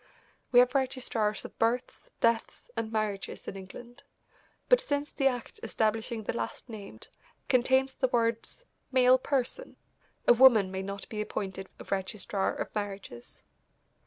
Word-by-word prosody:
We 245 - +4
have 250 0 +2
registrars 250 -6 0
of - - -11
births, 235 +3 -1
deaths 230 - 0
and 220 -1 -2
marriages 215 -3 -3
in - - -5
England, 215 +6 -10 0.7
but - - +6
since 285 0 -2
the 270 - +2
act 245 -3 -3
establishing 225 +1 -1
the 210 - -3
last 240 - -4
named 210 -3 -9 0.4
contains 260 +1 +3
the 260 - +1
words 230 - 0 0.3
"male 255 0 +6
person," 275 - -2 0.5
a - - +9
woman 230 -6 +6
may 190 0 -3
not 200 +1 -6
be 210 -1 -4
appointed 190 -2 -4
a - - -7
registrar 195 0 -2
of - - -5
marriages. 195 - -6
230 Hz, 140 wpm, -30 LUFS, 205-255 Hz, 0.7 s, a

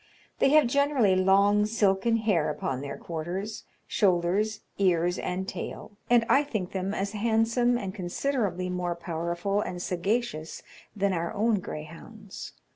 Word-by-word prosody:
They - - +4
have 305 0 +6
generally 265 -6 +3
long 200 +2 +4
silken 215 0 +2
hair 205 -8 +1
upon 135 -3 -3
their 140 0 -5
quarters, 175 +6 -5 0.2
shoulders, 195 +3 +1 0.2
ears, 175 -2 +2
and 190 +1 -3
tail; 205 - -6
and 240 -1 +5
I 280 - +5
think 215 -10 -4
them 190 0 -2
as 200 0 -2
handsome, 230 +3 +2
and 195 -5 -4
considerably 190 -1 -2
more 180 -1 -2
powerful 170 +4 -2
and 180 -3 -4
sagacious, 180 -2 -2 0.3
than 200 -1 +1
our 170 -1 -2
own 215 0 +2
greyhounds. 180 +6 -9
195 Hz, 135 wpm, -27 LUFS, 175-220 Hz, 0.3 s, have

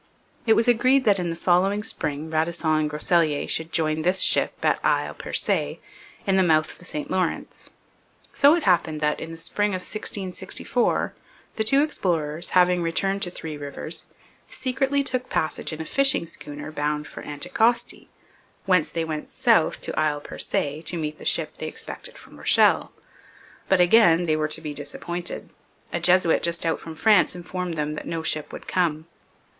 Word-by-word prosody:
It 225 - +7
was 230 - +2
agreed 255 +3 +4
that 200 -3 +4
in 175 -1 -2
the 165 - -3
following 190 +4 +2
spring 150 -6 -3
Radisson 160 0 0
and 155 -1 +2
Groseilliers 150 0 +1
should 160 +1 -1
join 155 -1 +1
this 180 +3 +2
ship - - +3
at - - +3
Isle - - +1
Percé - - -1 0.5
at 195 -2 +2
the 190 - +5
mouth 155 -3 +3
of - - -16
the 180 - -13
St 150 -4 -5
Lawrence. 185 -3 -2 0.6
So 285 +3 +6
it 340 - -2
happened 170 -4 +2
that, 150 0 +1
in 165 - -7
the 165 - -8
spring 205 +5 -1
of 185 - -2
1664, 195 -2 -2 0.4
the 220 - 0
two 275 +6 +4
explorers, 170 - -1
having 180 0 +4
returned 195 +4 0
to 180 - 0
Three 160 -3 -6
Rivers, 150 +3 -4 0.4
secretly 270 +2 0
took 255 -2 -1
passage 155 - -2
in 155 - -6
a 160 - -4
fishing 275 - +2
schooner 150 -3 -7
bound 150 0 -2
for - - -9
Anticosti, 230 +11 -1 0.6
whence 180 -5 +3
they 165 -1 -2
went 155 -1 -5
south 235 -10 +2
to - - -3
Isle 150 -1 +1
Percé 145 +1 -3
to 170 +2 -2
meet 155 -1 -4
the - - -11
ship - - -1
they - - -4
expected - - -8
from - - -15
Rochelle. - - +3 0.8
But 190 - +4
again 175 -2 +5
they 155 -2 +2
were 155 0 0
to 155 +1 -3
be 150 -2 -5
disappointed; 160 +5 -5 0.4
a - - 0
Jesuit 180 -2 +4
just 170 0 -1
out 165 - 0
from 160 -1 -9
France 205 +2 +4
informed 180 0 -4
them 150 -1 -2
that 155 - -7
no 165 -1 -3
ship 155 -2 -1
would - - -9
come. 160 -4 0
170 Hz, 175 wpm, -24 LUFS, 155-195 Hz, 0.8 s, It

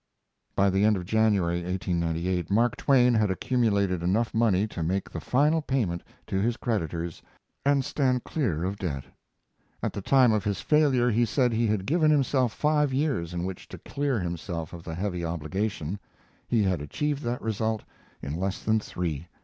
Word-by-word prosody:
By 100 0 +3
the 95 +2 +2
end 105 -1 +4
of 90 - -5
January, 100 -5 +2
1898, 90 -1 -1
Mark 115 +4 +2
Twain 125 -3 +4
had 110 -3 +2
accumulated 100 -3 +1
enough 105 +7 +1
money 110 -4 +3
to 105 -5 -6
make 95 +4 -1
the - - -4
final 150 +5 +2
payment 115 - -1 0.2
to 95 - -1
his 115 +2 0
creditors 85 - -3 0.4
and 140 -1 +2
stand 130 -4 +1
clear 100 - -1
of 95 +2 -2
debt. 70 -9 -3 0.8
At - - -1
the 100 - -4
time 130 +2 +5
of 105 -3 +1
his 100 -2 -1
failure 135 -6 +3
he 115 +2 +3
said 120 +2 +2
he 115 +1 +2
had 105 -3 0
given 155 - +3
himself 135 -4 +2
five 150 +1 +1
years 130 - 0
in 90 0 -3
which 95 -1 -6
to - - -9
clear 140 -4 -2
himself 85 -2 -4
of 85 -1 -8
the 80 - -6
heavy 90 -1 -2
obligation. 85 +2 -3 0.5
He 115 -3 +2
had 95 -5 0
achieved 145 - -2
that 120 -1 -3
result 110 0 -1 0.4
in 70 - -4
less 95 0 -2
than 110 0 +2
three. 85 -6 -4
105 Hz, 175 wpm, -27 LUFS, 90-125 Hz, 0.8 s, time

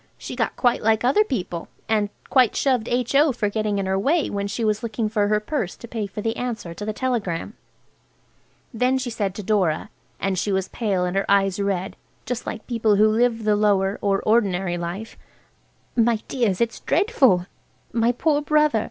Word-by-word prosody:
She - - -7
got - - -1
quite 245 -2 +2
like 220 +1 +2
other 270 +12 +4
people, 180 - -4 0.2
and 210 -2 +1 0.2
quite 255 -5 +4
shoved 255 -5 +1
H.O. 265 +4 +2
for 215 -4 -1
getting 210 -1 -1
in 195 - -1
her 190 0 0
way 295 - +1
when 200 0 -2
she 220 +3 -2
was 215 0 +1
looking 225 -1 -2
for 210 -2 +1
her 210 0 +2
purse 215 - -3
to 235 - -10
pay 220 -3 -3
for 210 - -6
the 225 +1 -1
answer 230 -9 -4
to 205 - -8
the 215 - -2
telegram. 215 -6 -2 1.2
Then 250 +3 +2
she 250 -2 -3
said 200 -4 -2
to 210 - -6
Dora–and 190 -1 -1
she 205 - -1
was 190 -1 -1
pale 195 -6 -1
and 180 +1 -3
her 195 - 0
eyes 195 -1 +3
red, 195 -2 -1 0.3
just 245 -1 -4
like 220 - -5
people 225 -3 +2
who 210 +2 +5
live 225 +1 +1
the 210 -1 +3
lower 200 -1 +2
or 195 -1 +1
ordinary 195 -5 +1
life–"My 220 +5 -4
dears, 230 -8 0
it's 235 0 0
dreadful! 280 - +3 0.5
My 230 +1 +3
poor 290 +4 +1
brother! 300 -5 +3
215 Hz, 185 wpm, -23 LUFS, 195-240 Hz, 1.2 s, who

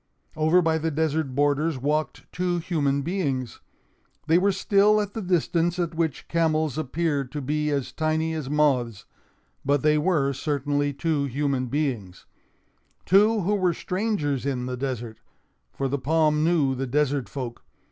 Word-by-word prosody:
Over 160 +3 +3
by 160 0 +1
the 160 +1 -1
desert 155 -3 -1
borders 145 +2 +1
walked 150 +4 -2
two 180 0 0
human 145 -5 0
beings. 140 - -2 0.7
They 165 +2 +4
were 200 +2 +3
still 200 +2 +3
at 205 -1 -3
the 225 - -4
distance 175 -1 +1
at 170 -2 -1
which 160 -2 -2
camels 160 -4 +1
appear 155 -1 -1
to 140 +4 -6
be 150 +2 -1
as 140 -3 -2
tiny 160 0 -1
as 155 -4 -4
moths; 130 -8 +1 0.6
but 140 0 +1
they 150 0 +4
were 150 -5 +1
certainly 145 +1 -1
two 145 0 -1
human 135 -1 -1
beings—two 140 - -1
who 195 +4 0
were 185 -4 +1
strangers 180 - -1
in 130 -3 -2
the 125 0 -3
desert; 120 -4 -4 0.5
for 135 - -2
the 140 +1 -2
palm 155 +2 +2
knew 160 -5 +2
the 135 +1 -3
desert 145 0 0
folk. 125 -4 -6
150 Hz, 150 wpm, -25 LUFS, 135-165 Hz, 0.7 s, They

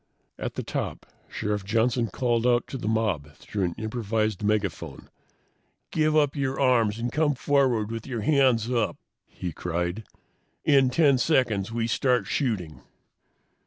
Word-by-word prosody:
At - - -4
the - - -3
top, - - -4 0.2
Sheriff 105 -1 -2
Johnson 115 +3 +1
called 120 0 0
out 120 -1 +3
to 135 - -4
the 105 - -4
mob 100 -10 -1
through 100 +5 -3
an 85 - -3
improvised 110 -2 -2
megaphone. 105 -4 -2 0.8
"Give 155 -1 +2
up 145 -1 +2
your 135 -1 -2
arms 115 -6 +3
and 120 +1 -3
come 150 -2 +1
forward 125 -5 +1
with 115 +1 -5
your 120 -4 -3
hands 130 -3 +3
up!" 115 -3 0 0.3
he 90 -2 -6
cried. 85 +5 -3 0.6
"In 135 -3 +5
10 140 -1 +4
seconds 120 -9 +1
we 115 0 -1
start 125 -1 +1
shooting!" 95 - -2
115 Hz, 145 wpm, -26 LUFS, 105-130 Hz, 0.8 s, In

